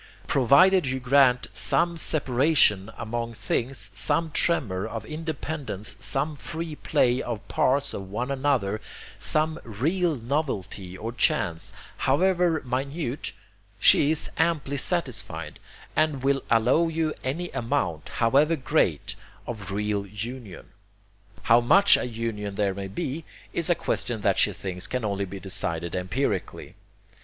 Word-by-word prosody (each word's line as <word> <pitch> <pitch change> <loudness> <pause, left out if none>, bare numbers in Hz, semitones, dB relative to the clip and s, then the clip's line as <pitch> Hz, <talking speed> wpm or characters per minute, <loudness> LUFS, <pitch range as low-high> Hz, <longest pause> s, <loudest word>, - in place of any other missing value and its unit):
Provided 140 +7 +4
you 130 0 -1
grant 125 -1 +4
SOME 170 0 +1
separation 130 - +3
among 115 +1 -4
things, 110 -1 -2
some 160 - 0
tremor 110 - +1
of 110 -2 -6
independence, 150 -9 -4
some 145 +7 -1
free 160 +2 -5
play 125 -2 +1
of 115 -2 -5
parts 140 +2 +1
on 95 -1 -6
one 120 +7 -3
another, 130 -7 0 0.4
some 155 +1 +1
real 160 - 0
novelty 110 - -3
or 115 +4 -5
chance, 85 -7 0 0.3
however 175 +3 +2
minute, 135 +2 -3 0.5
she 145 - +7
is 155 -1 -1
amply 155 -4 0
satisfied, 105 - -2 0.4
and 150 -4 +1
will 135 0 +2
allow 125 +9 +3
you 160 -1 -1
any 165 +7 -3
amount, 90 -9 -2
however 140 +8 +3
great, 130 - 0 0.3
of 105 -6 -6
real 105 0 -2
union. 105 0 -7 0.7
How 115 +1 +5
much 195 +12 +6
of - - -1
union 105 -3 -4
there 100 -1 0
may 100 0 -5
be 135 +11 -4 0.3
is 170 0 +2
a 175 - +4
question 120 -7 -2
that - - +2
she - - +4
thinks 90 -2 -5
can 125 -3 -3
only 100 -1 -1
be 95 +1 -8
decided 85 -3 -2
empirically. 95 +10 -3
125 Hz, 130 wpm, -25 LUFS, 105-155 Hz, 0.7 s, she